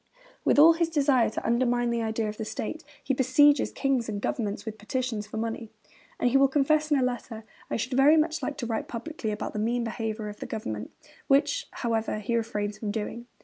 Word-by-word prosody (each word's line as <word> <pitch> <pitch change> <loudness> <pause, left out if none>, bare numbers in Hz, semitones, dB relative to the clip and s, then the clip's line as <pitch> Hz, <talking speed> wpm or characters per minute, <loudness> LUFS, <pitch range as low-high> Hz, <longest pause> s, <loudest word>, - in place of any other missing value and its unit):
With - - +3
all 320 +3 +9
his 330 0 0
desire 280 -6 +3
to - - -5
'undermine 240 0 +2
the 235 0 0
idea 220 0 -1
of 210 0 -5
the - - -3
state,' 220 +8 -5 0.2
he 275 - 0
besieges 270 +3 +4
king 275 -3 0
and 210 -2 -3
government 210 0 -2
with 220 -1 -6
petitions 225 -1 -3
for 220 - -7
money; 225 0 -3 0.5
and 245 - +2
he 270 - +5
will 275 0 +6
confess 300 +3 +2
in 295 - +4
a 260 - +2
letter, 240 -3 -3 0.3
'I - - -1
should 255 +3 -3
very 280 +5 +6
much 315 +1 +1
like 295 - -3
to 260 - -3
write 225 -1 -2
publicly 245 0 -5
about 210 0 -4
the 210 - -3
mean 235 +3 0
behaviour 220 -1 -3
of 210 0 -8
the - - -6
government,' 110 - -5 0.4
which, 295 - +2
however, 225 -3 -1
he 215 +3 -2
refrains 210 -2 -2
from 215 - -3
doing. 225 +3 -4
235 Hz, 215 wpm, -27 LUFS, 220-275 Hz, 0.5 s, all